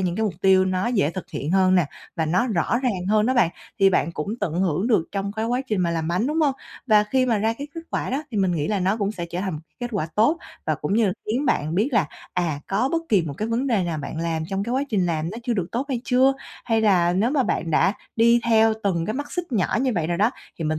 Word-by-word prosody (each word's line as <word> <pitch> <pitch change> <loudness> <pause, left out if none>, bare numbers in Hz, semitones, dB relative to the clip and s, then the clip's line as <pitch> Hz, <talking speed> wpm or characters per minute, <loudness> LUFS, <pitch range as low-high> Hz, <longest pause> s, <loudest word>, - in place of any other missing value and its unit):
những 180 -2 0
mục 215 -5 0
tiêu 190 -1 +5
nó 185 +1 0
dễ 205 -11 +1
thực 185 +1 -7
hiện 150 -2 -4
hơn 185 0 +4
nè 180 -4 +3 0.3
và 160 - 0
nó 185 +10 +2
rõ 220 +3 +1
ràng 190 -8 -1
hơn 215 +1 +3
đó 260 - +2
bạn, 195 -9 +4 0.3
thì 195 -1 +5
bạn 170 -2 +1
cũng 150 +3 -4
tận 195 -6 -1
hưởng 185 +2 +1
được 215 -9 +3
trong 200 0 -2
cái 220 +1 -2
quá 245 +3 0
trình 215 -6 0
mà 170 -1 +1
làm 165 -1 -2
bánh, 180 +7 0
đúng 305 +3 0
hông? 290 -3 +2 0.3
Và 210 -3 +5
khi 255 +4 +1
mà 230 -4 +2
ra 220 +2 +1
cái 285 - -5
kết 330 - -5
quả - - -2
đó, 275 +3 -1
thì 225 - -4
mình 190 -3 +2
nghĩ 155 -3 -1
là 205 -2 0
nó 190 +3 +1
cũng 205 -2 -1
sẽ 175 -5 -5
trở 175 - -3
thành 190 -1 -2
một 150 - -6 0.2
kết 245 - -2
quả 190 -7 -1
tốt 260 +11 +3 0.3
và - - +2
cũng 195 - -2
như 225 0 +3
là 190 - +1
khiến 250 +7 -1
bạn 155 - 0
biết 210 +8 +2
là, 210 -10 +3 0.3
à, 165 -5 -1
có 215 +7 +1
bất 330 0 +1
kỳ 200 -5 +4
một 150 -3 -5
cái 215 +5 -2
vấn 235 +4 0
đề 220 -8 +1
nào 165 -3 -2
bạn 145 +2 -6
làm 165 -1 -1
trong 195 0 -2
cái 235 - -3
quá 265 +2 +1
trình 195 -7 +1
làm 165 -1 -1
nó 220 - -6
chưa 245 0 -1
được 185 -5 -1
tốt 250 +4 -1
hay 255 -4 -1
chưa, 260 +2 +4 0.3
hay 225 -1 +1
là 180 -5 +3
nếu 205 +7 +1
mà 280 -2 +2
bạn 165 -8 -1
đã 175 +5 +3 0.2
đi 235 +1 +5
theo 225 -1 +5
từng 170 -5 0
cái 215 - -2
mắt 290 +2 -5
xích 350 -6 -4
nhỏ 195 -6 +1
như 260 -1 +1
vậy 165 -3 0
rồi 170 +1 -1
đó, 215 +4 +3 0.3
thì 165 - -3
mình 155 0 0
200 Hz, 290 wpm, -23 LUFS, 175-235 Hz, 0.3 s, tiêu